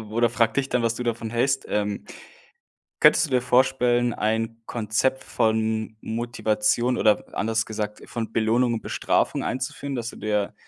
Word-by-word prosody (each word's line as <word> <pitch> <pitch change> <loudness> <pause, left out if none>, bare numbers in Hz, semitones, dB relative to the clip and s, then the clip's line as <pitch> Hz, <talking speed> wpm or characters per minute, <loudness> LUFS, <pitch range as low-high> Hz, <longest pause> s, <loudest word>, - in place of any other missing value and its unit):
oder 115 +1 +2
frage 115 -2 +1
dich 135 -1 0
dann, 125 - 0
was 115 -1 +1
du 125 - -4
davon 115 -2 -2
hältst. 130 +3 0
Ähm, 105 -1 -1 1.0
könntest - - +6
du - - -14
dir 125 - +3
vorstellen, 125 -1 +2
ein 115 +2 -1
Konzept 120 +4 -1
von 110 -1 0
Motivation 120 +1 0
oder 105 -1 +3
anders 115 +1 0
gesagt, 105 -1 -5
von 115 -2 -5
Belohnung 115 +2 +2
und 110 - -4
Bestrafung - - 0
einzuführen, 135 +2 -3
dass 120 -1 -3
du - - -11
dir 105 -1 -1
115 Hz, 155 wpm, -24 LUFS, 110-125 Hz, 1.0 s, könntest